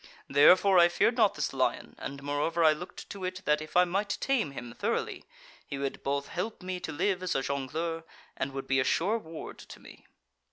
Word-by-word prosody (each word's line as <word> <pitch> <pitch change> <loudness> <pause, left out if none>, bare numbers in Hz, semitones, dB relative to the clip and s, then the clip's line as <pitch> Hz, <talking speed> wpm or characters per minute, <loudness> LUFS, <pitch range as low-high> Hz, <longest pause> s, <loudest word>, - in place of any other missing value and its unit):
Therefore 180 +7 +6
I 170 - +8
feared 210 +7 +2
not 220 -5 +3
this 150 - -2
lion, 130 -1 -1
and, 140 0 -6
moreover, 145 +4 0
I 155 -1 +7
looked 175 +4 -9
to 200 -2 -7
it 185 0 -4
that 150 0 +2
if 155 +2 -3
I 180 - +7
might 200 +3 -1
tame 260 - +1
him 120 -4 -8
thoroughly, - - -2 0.4
he 140 - -6
would 140 0 -3
both 140 0 -2
help 185 +2 -4
me 185 0 -3
to 160 - -5
live 185 +5 0
as 185 -1 -1
a 135 - +1
jongleur, 155 +5 -3 0.3
and 135 - -2
would 135 0 -5
be 135 0 +2
a - - +3
sure 200 +12 +1
ward 160 -5 -9
to - - -12
me. - - -15
165 Hz, 210 wpm, -29 LUFS, 140-185 Hz, 0.4 s, I